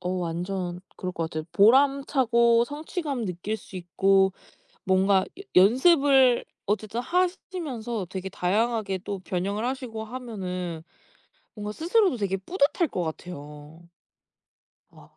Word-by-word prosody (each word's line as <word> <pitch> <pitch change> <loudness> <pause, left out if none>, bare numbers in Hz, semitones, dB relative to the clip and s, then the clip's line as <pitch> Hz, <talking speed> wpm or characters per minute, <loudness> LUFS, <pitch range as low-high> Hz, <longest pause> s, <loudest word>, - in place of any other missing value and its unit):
어 180 - -3
완전 180 0 -3 0.2
그럴 185 - -4
것 165 - -2
같아요. 155 0 -4
보람차고 240 -1 +4
성취감 295 - -4
느낄 185 +3 -3
수 210 - -16
있고 190 +2 +2 0.5
뭔가 190 0 +3
여 - - -8
연습을 265 - +5 0.2
어쨌든 215 +3 -1
하시면서 310 - -2
되게 190 0 -5
다양하게 200 +2 0
또 200 -2 -4
변형을 195 +4 -2
하시고 250 -3 -4
하면은 185 -8 -5 0.7
뭔가 210 -1 -5
스스로도 350 - +2
되게 200 -3 -1
뿌듯할 300 - 0
것 180 - -2
같아요. 155 -1 -8 1.0
와 - - -19
210 Hz, 260 characters per minute, -26 LUFS, 185-260 Hz, 1.0 s, 연습을